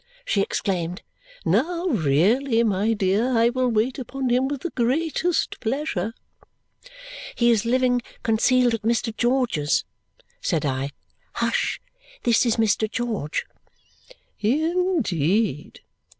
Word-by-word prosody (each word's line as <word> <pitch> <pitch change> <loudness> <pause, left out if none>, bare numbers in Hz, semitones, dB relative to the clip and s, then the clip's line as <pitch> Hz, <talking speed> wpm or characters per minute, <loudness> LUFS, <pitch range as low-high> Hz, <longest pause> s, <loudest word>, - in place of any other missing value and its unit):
she 200 - +1
exclaimed. 180 -1 -2 0.4
"Now 345 +1 +1
really! 225 - +2
My 210 +1 +1
dear, 215 +5 +1
I 230 +1 +4
will 255 +1 0
wait 235 +4 0
upon 260 +1 -3
him 250 +2 +2
with 280 -1 -4
the 345 - -4
greatest 320 +7 0
pleasure." 225 - -2 1.2
"He 240 0 +4
is 225 -1 +1
living 250 0 +2 0.2
concealed 240 +2 +3
at 225 - -2
Mr. 230 0 0
George's," 235 - +1 0.6
said 155 -2 0
I. 135 0 -1 0.4
"Hush! 485 0 0 0.4
This 235 +1 +3
is 230 - +2
Mr. 220 -1 +1
George." 220 -11 -2 0.9
"In 330 - +1
deed!" 175 - -1
235 Hz, 115 wpm, -23 LUFS, 205-260 Hz, 1.2 s, I